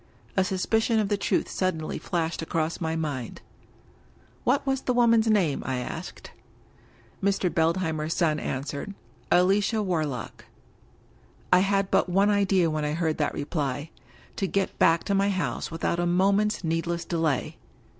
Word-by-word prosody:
A 190 - +3
suspicion 220 +5 +1
of 210 -2 +1
the 205 - +2
truth 200 - 0
suddenly 165 -4 -2
flashed 165 -3 -2
across 165 0 -2
my 160 0 -1
mind. 145 -7 -4 0.5
'* - - -31
What 275 +3 +2
was 270 -1 0
the 250 - -1
woman's 230 -2 +4
name?" 190 -10 +2
I 130 -1 -2
asked. 125 - -7 0.9
Mr. 195 -2 +1
Beldheimer's 160 -1 0
son 155 -3 +1
answered: 145 +9 -4 0.2
" - - -31
Alicia 205 +4 +2
Warlock." 155 - -3 1.1
I 180 - +7
had 195 0 +1
but - - +3
one 195 +3 +3
idea 195 -3 +3
when 155 -1 -2
I 150 0 -1
heard 160 -1 -1
that 150 - 0
reply 145 0 -3 0.2
— - - -26
^to 195 - -2
get 195 -1 -1
back 165 0 +4
to 200 - -1
my 200 +1 +2
house 185 -7 -2
without 165 +1 -2
a 175 - +1
moment's 200 +4 +2
needless 165 +1 -1
delay. 160 -6 -1
175 Hz, 155 wpm, -26 LUFS, 160-200 Hz, 1.1 s, I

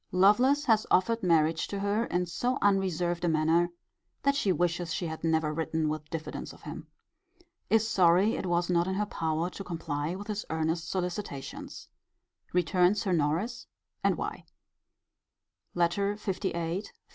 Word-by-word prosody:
Lovelace 245 +10 +4
has 220 -3 +3
offered 230 +5 +3
marriage 165 -2 +2
to 200 - -4
her 205 +3 +1
in 180 -4 0
so 245 +10 -1
unreserved 180 -3 +1
a - - +2
manner, 160 +2 +3 0.5
that 280 - +4
she 245 -9 +1
wishes 175 -1 0
she 175 - -2
had 160 -1 -5
never 160 -2 +1
written 160 0 -1
with 155 0 -4
diffidence 160 -1 -5
of - - -17
him. - - -7 0.8
Is 225 0 +3
sorry 190 0 +4
it 190 - -3
was 175 0 +1
not 175 0 +2
in 190 - -1
her 210 +2 0
power 165 -2 -2
to 195 - -7
comply 165 -2 -3
with 200 +2 -7
his 210 -1 -3
earnest 160 +1 -1
solicitations. 180 -6 -5 0.6
Returns 180 +3 +2
her 190 - 0
Norris: 170 +10 0 0.4
and - - +2
why. - - -5 1.3
LETTER 175 +4 +1
LVIII. 185 -3 -2
175 Hz, 150 wpm, -29 LUFS, 165-200 Hz, 1.3 s, Lovelace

